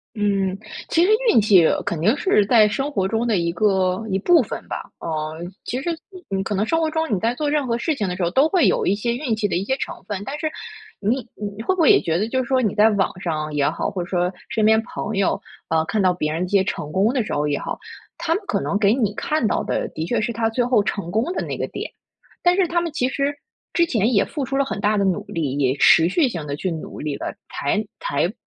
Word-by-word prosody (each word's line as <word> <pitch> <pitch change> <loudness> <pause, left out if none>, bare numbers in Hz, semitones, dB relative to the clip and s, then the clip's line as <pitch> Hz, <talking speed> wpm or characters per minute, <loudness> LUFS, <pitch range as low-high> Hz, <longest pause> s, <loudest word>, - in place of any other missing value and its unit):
嗯， 195 -3 0 0.3
其 335 - +3
实 385 - +3 0.2
运 230 - +5
气 200 -5 +5 0.2
肯 170 - -2
定 215 - +3
是 290 - +3
在 225 -1 +6
生 270 +7 -1
活 195 -10 0
中 225 +4 0
的 225 -3 +2
一 170 -1 0
个 190 +1 +1
一 190 -1 0
部 335 - +5
分 220 - -6
吧。 - - -6
嗯， 160 +2 -4
其 250 - -3
实 345 - -1 0.2
你 370 -3 -13
你 - - 0
可 205 +2 -3
能 200 +2 +1
生 325 +5 +1
活 320 -1 +1
中 320 -6 0
你 185 - -1
在 230 +4 +1
做 295 +3 -2
任 295 -2 +1
何 230 -1 0
事 310 +6 0
情 210 -8 -2
的 180 - -3
时 185 - -3
候， 170 - +1
都 270 - +4
会 355 -1 +3
有 - - +2
一 190 - +3
些 235 +3 -1
运 245 -3 -1
气 215 - 0
的 - - -1
一 185 - -1
些 265 +6 0
成 - - -6
分。 200 -2 -3
但 280 +5 -5
是， 315 -1 -1 0.5
你 215 +5 +1 0.2
你 205 +1 -6
会 370 - +1
不 375 - -3
会 305 - +6
也 - - +5
觉 165 0 0
得 210 - 0
就 260 +2 0
是 255 - -8
说 260 -1 +3
你 210 -5 0
在 215 +1 +5
网 200 -3 +1
上 155 -3 -3
也 145 -1 +2
好， - - -2
或 190 -3 -3
者 175 - -7
说 180 -1 0 0.2
身 220 - 0
边 220 +1 +5
朋 220 -2 -5
友 195 -1 +1 0.3
呃， 160 0 +2
看 215 +6 -1
到 185 -1 +4
别 155 -3 -2
人 165 +3 -2
的 - - 0
一 - - -11
些 200 -2 +3
成 150 -5 -4
功 195 +7 +2
的 260 -3 +1
时 - - -5
候 145 +1 0
也 145 -1 0
好， - - -4 0.4
他 330 -1 0
们 395 - -2
可 - - 0
能 200 - -1
给 205 0 +4
你 220 -6 0
看 300 +1 0
到 - - 0
的 - - -2
的 160 - -5
确 230 +4 0
是 235 +2 -1
他 225 0 0
最 245 +2 0
后 240 -3 +3
成 200 -4 -3
功 220 +5 +1
的 - - -2
那 - - -4
个 - - -1
点。 - - -6 0.5
但 355 0 +4
是 380 -2 +3
他 345 +1 0
们 340 -1 -2
其 255 -4 0
实 280 +2 -1 0.4
之 345 - +4
前 235 - +1
也 200 - +4
付 290 - -4
出 270 +1 -3
了 275 - +3
很 215 -7 -4
大 210 +1 +2
的 200 - +2
努 195 +2 0
力， 145 -5 -2
也 135 -1 +1
持 160 +3 +6
续 270 - +2
性 170 -10 -5
地 145 -1 -3
去 185 +5 -2
努 160 - -7
力 150 -1 -3
了， - - -5 0.2
才 210 +10 0 0.2
才 150 +7 0
210 Hz, 295 characters per minute, -22 LUFS, 180-260 Hz, 0.5 s, 在